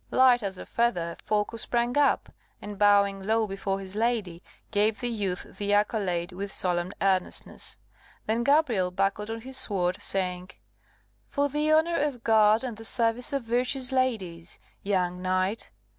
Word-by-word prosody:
Light 255 -2 +5
as 195 -2 -4
a - - -8
feather, 175 -8 -1
Folko 210 +1 -1
sprang 240 +1 +1
up, 290 -1 +2 0.3
and 205 -1 -8
bowing 200 -1 +4
low 220 +3 +1
before 195 -1 -3
his 190 0 -9
lady, 215 -7 -1 0.3
gave 210 +1 +2
the 245 - -2
youth 200 -6 -2 0.2
the 205 0 0
accolade 195 -4 0
with 195 +2 -6
solemn 175 0 0
earnestness. 190 -2 -1 0.5
Then 230 +2 0
Gabrielle 255 -10 +2
buckled 195 +3 -1
on 225 0 -5
his 265 +2 -6
sword, 185 -7 +1
saying, 180 -1 -2 0.8
"For 285 0 0
the 300 +2 0
honour 320 +2 +3
of 280 -5 -2
God 220 0 +4
and 240 -4 -5
the 225 - -10
service 230 +2 +1
of 275 -3 -1
virtuous 250 +3 +1
ladies, 195 -11 -2 0.2
young 180 -2 -1
knight. 185 +3 -1
210 Hz, 155 wpm, -27 LUFS, 190-240 Hz, 0.8 s, Light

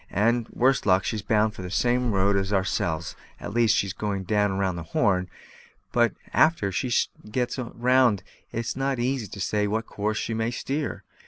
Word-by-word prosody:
And, 115 +3 +1
worst 130 -2 +2
luck, 95 0 +4
she's 110 -2 -2
bound 105 0 +2
the 90 -1 -7
same 125 +5 +1
road 100 0 +2
as 95 0 0
ourselves 90 -4 -1 0.2
at 100 - -6
least, 115 -2 +4
she's 100 -2 0
going 100 -2 -3
round 100 -2 +1
the 85 - -5 0.2
Horn; 90 -2 +2 0.6
but 120 -1 +3 0.2
a'ter 155 -12 +3
she 125 +6 -2 0.4
gets 125 +3 -1
round 120 -3 +2 0.3
it's 115 0 -3
not 135 0 -1
so 120 - -1
easy 125 -3 -1
to 100 - -9
say 105 +2 0
what 110 +2 -1
course 105 +1 -2
she 115 - -2
may 110 +1 0
steer. 140 +4 -3
110 Hz, 175 wpm, -26 LUFS, 100-120 Hz, 0.6 s, luck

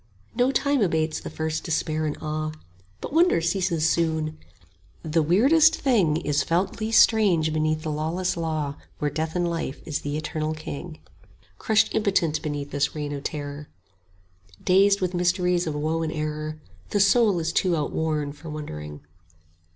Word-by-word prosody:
No 245 +1 +2
time 280 -1 +1
abates 160 -4 +1
the - - -7
first 160 0 -3
despair 155 -1 -1
and 150 - -3
awe, 155 0 -3 0.5
But - - -6
wonder 340 - +4
ceases 165 -2 0
soon; 160 -2 0 0.6
the 160 +1 +1
weirdest 280 - +5
thing 200 - +2
Is 150 -3 0
felt 180 +5 -1
least 220 +1 +6
strange 180 -8 +2
beneath 155 0 0
the 155 - -2
lawless 165 +5 -1
law 155 -4 -2 0.2
Where 145 -1 -1
Death 160 +1 -3
in 175 0 +1
Life 165 -5 -3
is 155 -2 -3
the 145 +1 -3
eternal 155 0 -3
king; 155 +2 -7 0.6
25 - - -34
Crushed 220 0 +2
impotent 175 -8 +1
beneath 145 -1 -4
this 140 +1 0
reign 145 -1 -3
of 140 - -5
terror, 145 0 -5 0.9
Dazed 195 +2 +4
with 180 -1 -1
mysteries 180 0 +1
of 155 - -2
woe 155 +2 -1
and 160 -1 -2
error, 155 0 -4 0.3
The 205 - 0
soul 200 0 +4
is 165 0 -2
too 180 -2 +2
outworn 150 -1 -1
for 155 +2 -11
wondering. 75 - -7
160 Hz, 160 wpm, -25 LUFS, 155-180 Hz, 0.9 s, least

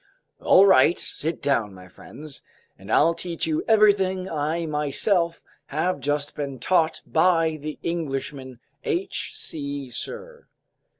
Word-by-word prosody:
"All 195 - +6
right, 185 -3 +5
sit 160 +2 -3
down, 115 -8 0
my 90 0 -13
friends, 145 +10 -11 0.3
and 95 +3 -10
I'll 165 +3 +4
teach 170 0 -4
you 155 -1 -1
everything 200 -4 +3
I 160 +1 -2
myself 165 +4 0 0.2
have 155 +3 -1
just 145 +2 -2
been 140 -2 -5
taught 165 +5 +1
by 165 -2 +2
the 150 0 -6
Englishman 135 -6 -4 0.2
H. 385 +4 -2
C. 140 - -5
Sirr!" 480 - -6
160 Hz, 125 wpm, -24 LUFS, 140-180 Hz, 0.3 s, All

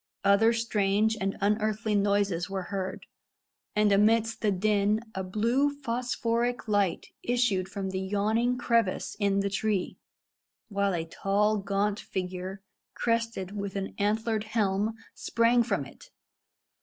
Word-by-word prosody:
Other 200 +3 +5
strange 220 -2 +1
and 195 0 -1
unearthly 215 +1 +1
noises 200 -3 +1
were 195 -1 -3
heard, 190 -1 -3 0.7
and 210 -1 +3
amidst 220 +2 +3
the 215 - +2
din 205 +2 +2
a 190 - -3
blue 230 +9 +1
phosphoric 245 -3 -2
light 200 -4 +1
issued 235 -7 +1
from 195 -1 -4
the 190 - -2
yawning 215 +6 +1
crevice 230 -5 0
in 200 -1 +2
the 200 - 0
tree, 200 -1 -1 0.7
while 200 -2 0
a 165 -1 -2
tall, 205 +5 +1
gaunt 200 +1 0
figure, 185 +1 -5 0.3
crested 230 -5 -1
with 200 -1 -4
an 195 -1 -3
antlered 215 +1 0
helm, 215 0 0 0.2
sprang 230 +1 +2
from 200 - -1
it. - - -15
205 Hz, 130 wpm, -28 LUFS, 195-225 Hz, 0.7 s, Other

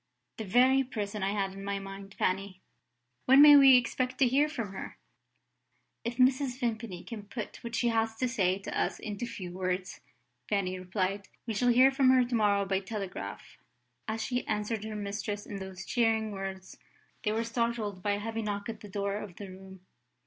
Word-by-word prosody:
"The 220 - -3
very 255 +6 +4
person 210 -4 -4
I 190 - +1
had 200 -2 -1
in 195 0 -8
my 200 0 -2
mind, 195 0 -9
Fanny! 185 0 -1 0.7
When 265 +2 +7
may 295 0 +10
we 270 -2 +9
expect 255 +1 -1
to 265 - +4
hear 280 +5 +3
from 230 -10 -4
her?" - - -7 1.1
"If 235 +1 -4
Mrs. 260 0 +3
Vimpany 225 -7 -3
can 215 -3 -8
put 220 -1 -6
what 235 -1 -4
she 240 - +2
has 225 -1 0
to 255 +3 0
say 190 -7 +1
to 195 - -7
us - - 0
into 215 +2 -4
few 185 -6 -7
words," 185 +1 -3 0.5
Fanny 185 -3 0
replied, 190 +1 -2 0.2
"we 225 - -2
shall 245 +4 +2
hear 255 +3 +6
from 270 -1 +3
her 255 -1 +5
to 245 - -6
morrow 205 -3 +3
by 195 -1 0
telegraph." 195 - -6 0.5
As 220 0 -2
she 250 -1 -1
answered 210 0 -2
her 215 -1 -5
mistress 205 0 -4
in 205 - -6
those 190 -1 -7
cheering 225 -2 +1
words, 195 -1 -7 0.4
they 210 - 0
were 225 +1 0
startled 230 -4 -2
by 205 +2 +1
a 200 - -2
heavy 225 +1 -3
knock 205 0 -3
at 225 - -6
the 210 - -11
door 200 0 -2
of 205 -4 -8
the 200 0 -8
room. 190 0 -12
210 Hz, 190 wpm, -30 LUFS, 195-235 Hz, 1.1 s, may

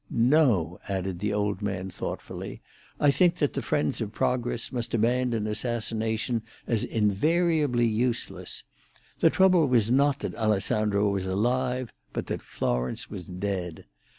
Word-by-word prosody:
No," 115 - +3
added 95 -2 -2
the 105 +2 -1
old 105 0 -1
man 95 -2 -3
thoughtfully, - - -6 0.4
"I 145 - +5
think 175 +3 +3
that 145 -5 0
the - - -2
friends 145 -4 0
of 105 -2 -3
progress 120 -1 -1
must 120 -2 -2
abandon 120 -1 +1
assassination 110 +1 -1 0.2
as 115 -3 0
invariably 145 - +2
useless. 115 +2 -1 0.6
The - - +6
trouble 185 -5 +4
was 120 -3 +3
not 140 +2 +3
that - - -3
Alessandro 105 -1 +1
was 95 -1 -1
alive, 125 +5 0 0.2
but - - -3
that - - -4
Florence 60 +1 -2
was 90 - -7
dead. 90 -2 -4
115 Hz, 135 wpm, -27 LUFS, 100-130 Hz, 0.6 s, The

